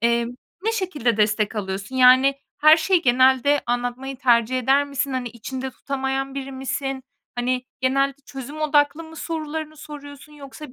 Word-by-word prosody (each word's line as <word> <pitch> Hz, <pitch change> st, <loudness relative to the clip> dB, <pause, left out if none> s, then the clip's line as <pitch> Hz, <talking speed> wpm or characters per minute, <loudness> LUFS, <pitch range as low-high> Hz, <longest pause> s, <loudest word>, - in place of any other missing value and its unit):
emm, 235 Hz, +1 st, +2 dB, 0.3 s
ne 450 Hz, +1 st, 0 dB
şekilde 300 Hz, -, -1 dB
destek 210 Hz, 0 st, +1 dB
alıyorsun? 195 Hz, +4 st, -4 dB
Yani 260 Hz, +2 st, +6 dB, 0.2 s
her 310 Hz, +1 st, +7 dB
şeyi 340 Hz, +2 st, +2 dB
genelde 260 Hz, +3 st, +4 dB
anlatmayı 245 Hz, +2 st, -2 dB
tercih 240 Hz, 0 st, +3 dB
eder 270 Hz, +3 st, +3 dB
misin? 280 Hz, -1 st, -3 dB
Hani, 250 Hz, -2 st, -2 dB
içinde 260 Hz, +3 st, -6 dB
tutamayan 270 Hz, 0 st, -3 dB
biri 275 Hz, 0 st, -5 dB
misin? 265 Hz, 0 st, -4 dB, 0.3 s
Hani, 250 Hz, +1 st, -1 dB, 0.2 s
genelde 275 Hz, +1 st, +1 dB
çözüm 275 Hz, +3 st, -8 dB
odaklı 295 Hz, +1 st, +2 dB
mı 325 Hz, 0 st, -13 dB
sorularını 310 Hz, -1 st, -5 dB
soruyorsun, 290 Hz, -1 st, -11 dB
yoksa 285 Hz, -1 st, -11 dB
270 Hz, 145 wpm, -23 LUFS, 245-290 Hz, 0.3 s, her